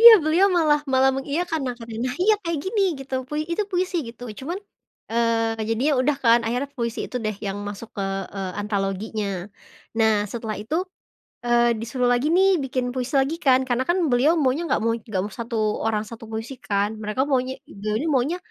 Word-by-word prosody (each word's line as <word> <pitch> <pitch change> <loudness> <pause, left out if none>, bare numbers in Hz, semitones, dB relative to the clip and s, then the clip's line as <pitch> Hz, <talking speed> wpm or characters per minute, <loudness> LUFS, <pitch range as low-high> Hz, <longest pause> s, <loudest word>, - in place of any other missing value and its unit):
Iya 470 +1 +13
beliau 340 +5 +4
malah 300 -3 +4
malah 265 +1 +5
mengiyakan 310 +4 -1
nah 250 - -2
katanya, 230 +2 -4
"Nah, - - -6 0.3
kayak 335 -2 -1
gini," 400 +1 +1 0.2
gitu 265 0 -6
pui 300 0 -2
"itu 425 - +1
puisi," 365 0 0
gitu 230 +1 -11 0.2
cuman, 335 +8 -3 0.5
eee, 225 -1 +1
jadinya 250 +7 +2
udah 290 +2 +2
kan 230 0 +7
akhirnya 245 +5 -1
puisi 235 -1 -2
itu - - -5
deh 215 -1 -1
yang 195 +1 -3
masuk 205 +2 -7
ke, 195 - -1 0.3
eee, 190 -1 -3
antologinya. 205 +1 -2 0.7
Nah 220 -1 +5 0.2
setelah 225 -2 -4
itu, 225 +10 -2 0.7
eee, 240 -1 +3
disuruh 245 +2 0
lagi 245 +4 +1
nih 385 +1 +5 0.2
bikin 255 -1 -1
puisi 255 +2 -3
lagi 280 +5 0
kan 260 0 +6
karena 250 +1 +1
kan 350 +2 +3
beliau 250 +6 +4
maunya 265 +5 +2
nggak - - +2
mau 230 - +3
nggak 215 -4 -3
mau 210 - -6
1 230 0 -3 0.3
orang 215 -1 +1
1 230 -1 -9
puisi 225 +4 -4
kan 200 +1 +1
mereka 210 +5 0
maunya 260 -1 +1 0.3
beliau 210 +1 -1
nih 325 - -1
maunya, 270 +7 +2
245 Hz, 190 wpm, -24 LUFS, 225-285 Hz, 0.7 s, Iya